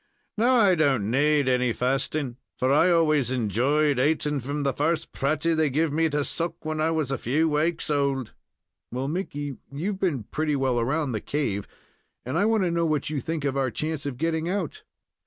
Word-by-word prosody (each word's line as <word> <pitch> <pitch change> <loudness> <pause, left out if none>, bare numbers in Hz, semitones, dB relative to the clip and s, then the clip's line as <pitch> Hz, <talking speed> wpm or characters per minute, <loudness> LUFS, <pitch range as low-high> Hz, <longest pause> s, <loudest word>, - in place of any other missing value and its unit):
Now, 240 +4 +3
I 205 -6 +5
don't 135 - +2
naad 145 +1 +3
any 125 -1 +2
fasting, 130 +1 -1 0.2
for 130 +1 +1
I 155 +5 +5
always 155 -7 +3
enjoyed 130 +5 +1
ating 150 +1 +1
from 140 +3 -3
the 140 -1 +1
first 160 +2 -1
pratie 155 +4 0
they 155 -2 +2
giv 150 +2 0
me 160 +1 +2
to 145 -1 0
suck 165 +2 -3
when 155 0 -2
I 160 - +2
was 155 -4 -1
a 135 - -1
few 150 +7 +1
waaks 160 +2 0
old." 140 -4 0 0.6
"Well, 130 +2 -2
Mickey, 145 -4 -4
you've 185 +8 -3
been 155 - 0
pretty 150 +6 -1
well 130 -3 +1
around 135 +4 0
the 110 -3 -3
cave, 110 -9 -2 0.6
and 130 +4 -3
I 190 +5 +3
want 220 -2 +2
to 175 - +1
know 170 0 +1
what 150 -1 -1
you 150 - -1
think 155 +2 -3
of 140 -1 0
our 135 -1 +1
chance 155 +2 -3
of 130 -4 -4
getting 165 +2 -1
out?" 185 -5 -3
150 Hz, 195 wpm, -25 LUFS, 135-160 Hz, 0.6 s, I